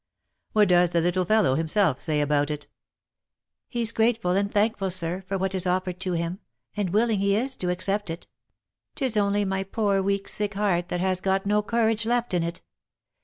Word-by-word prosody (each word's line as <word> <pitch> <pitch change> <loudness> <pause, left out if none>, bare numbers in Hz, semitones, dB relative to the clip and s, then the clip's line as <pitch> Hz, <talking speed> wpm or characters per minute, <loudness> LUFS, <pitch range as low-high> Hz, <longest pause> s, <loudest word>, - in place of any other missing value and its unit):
What 210 -3 +4
does 175 -1 +4
the 170 - +3
little 180 +2 +1
fellow 215 -7 +3
himself 160 0 +1
say 155 -3 +1
about 145 0 +1
it 150 -1 -5 0.4
?" - - -65
" - - -64
He's 235 -2 +1
grateful 225 -5 +1
and 200 +2 +1
thankful, 205 -2 +1
sir, 180 0 -1
for 195 0 -1
what 190 0 -1
is 185 -1 0
offered 180 0 -1
to 185 -1 -2
him, 170 +2 -2 0.4
and 205 -3 -1
willing 215 +2 +2
he 200 0 +2
is 260 +5 -1
to 180 - -1
accept 195 +2 -1
it. 165 +1 -6 0.4
— - - -60
Tis 260 -6 -1
only 205 0 +2
my 190 0 -1
poor 200 0 0
weak 200 0 -1
sick 205 -1 -2
heart 185 -4 0
that 175 - -2
has 185 -1 0
got 190 0 0
no 210 +1 +2
courage 225 0 0
left 240 -2 0
in 175 - +2
it. 170 0 -4
195 Hz, 205 wpm, -25 LUFS, 180-210 Hz, 0.4 s, What